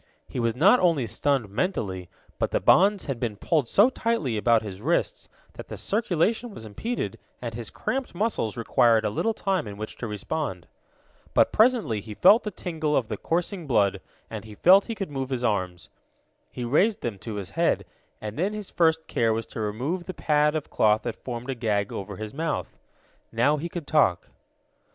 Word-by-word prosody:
He - - -5
was 115 -1 0
not 195 - +6
only 165 -8 +2
stunned 130 +2 0
mentally, 95 - -2 0.3
but - - +1
the - - 0
bonds 200 +1 +4
had 135 -5 -3
been 115 -4 -2
pulled 150 - +1
so 210 - +5
tightly 230 - -1
about 115 +1 +3
his 100 -2 -7
wrists 170 - -1 0.2
that - - -9
the - - -7
circulation 220 +2 0
was 110 - -9
impeded, 225 - -4 0.2
and - - -5
his - - -6
cramped 265 -7 -3
muscles 175 - -1
required 115 -1 +3
a 105 - 0
little 225 - 0
time 190 - -1
in 100 -1 -8
which 110 +1 -7
to 120 - -4
respond. 105 - -4 0.7
But - - +5
presently 220 - +3
he 105 0 -9
felt 220 - +6
the 210 - -4
tingle 160 -6 -2
of 120 -5 -1
the 110 - -2
coursing 175 - -2
blood, 105 -6 +2 0.3
and 110 -3 -7
he 110 -1 -11
found 190 - +6
he 230 - -4
could 195 -7 -5
move 135 -2 -3
his 125 -2 -2
arms. 95 -6 -1 0.6
He 125 - -5
raised 190 - +2
them 110 -5 -4
to 110 0 -6
his 100 -3 -5
head, - - +1 0.3
and 110 +3 -6
then 195 +5 0
his 210 -2 -6
first 160 -1 +2
care 115 -1 +1
was 115 +1 -2
to - - -8
remove 130 - -3
the 185 - -5
pad 150 0 +2
of 155 - -4
cloth 110 0 +3
that 120 - -5
formed 125 +1 -4
a - - -1
gag 105 -5 -1
over 100 0 -5
his 110 +1 -7
mouth. 160 +1 -3 0.5
Now 125 +7 +2
he 170 +4 -4
could 170 -3 -6
talk. 95 - +2
135 Hz, 195 wpm, -26 LUFS, 110-180 Hz, 0.7 s, not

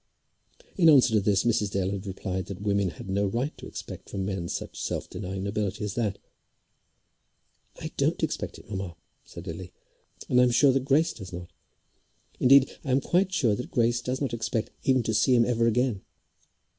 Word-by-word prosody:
In 170 -4 +6
answer 130 -6 +6
to 110 - +5
this 100 -1 +2
Mrs. 110 -3 +1
Dale 95 -1 -1
had 100 0 -5
replied 95 -1 -4
that 100 -3 -7
women 100 -2 +1
had 85 - -10
no 100 +1 +1
right 120 +9 -2
to - - -8
expect - - -8
from 95 -1 -3
men 95 -3 -3
such - - -5
self - - -3
denying 95 +1 -5
nobility 100 0 -2
as 105 -1 -3
that. 105 -4 -1 1.6
"I - - -6
don't - - +1
expect - - -2
it, - - -15
mamma," 95 -4 -5 0.3
said - - -11
Lily. 90 +2 -7 0.6
"And 125 - +3
I - - +6
am - - +3
sure 130 +3 +5
that 130 0 0
Grace 155 +4 +3
does 95 -4 -10
not. 85 -1 -8 0.9
Indeed 135 +1 +5
I 145 - -6
am 130 +1 +4
quite 180 +7 +1
sure 135 - +2
that 125 - -4
Grace 120 0 +1
does 125 +2 -2
not 135 -4 -1
expect 115 -1 -2
even 130 -2 +2
to 110 - -1
see 110 +4 +4
him 120 -1 +5
ever 115 -1 +2
again. 115 -3 +1
110 Hz, 195 wpm, -27 LUFS, 95-125 Hz, 1.6 s, In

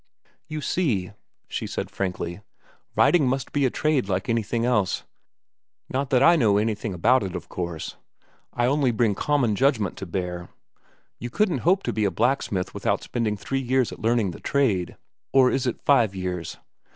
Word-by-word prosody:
"You 155 0 -5
see," 115 - 0 0.4
she - - -4
said - - -4
frankly, 90 -1 -3 0.5
"writing 165 -7 +4
must 130 0 -1
be 140 -2 +2
a - - 0
trade, 145 -6 0
like 95 +2 -1
anything 115 0 0
else. 105 -7 +1 0.9
Not 135 0 -2
that 130 0 +4
I 170 +4 +7
know 110 -10 +3
anything 110 0 -1
about 125 +9 +4
it, 95 -2 -4
of 90 - -7
course. 85 -3 -5 0.5
I 120 - 0
only 140 +1 +2
bring 115 -2 +2
common 130 -2 +1
judgment 120 - +1
to 95 - -6
bear. 90 0 -4 0.7
You 120 - -5
couldn't 185 - +1
hope 185 +8 +2
to - - -2
be 110 -1 0
a - - +3
blacksmith 95 -1 0
without - - -1
spending 110 -3 -2
three 135 +6 -2
years 130 -1 +1
at - - -9
learning 115 -4 +1
the - - -10
trade—or 130 +2 0
is 130 -1 0
it 120 - -3
five 115 -8 +4
years! 90 -3 -4
115 Hz, 170 wpm, -24 LUFS, 95-135 Hz, 0.9 s, I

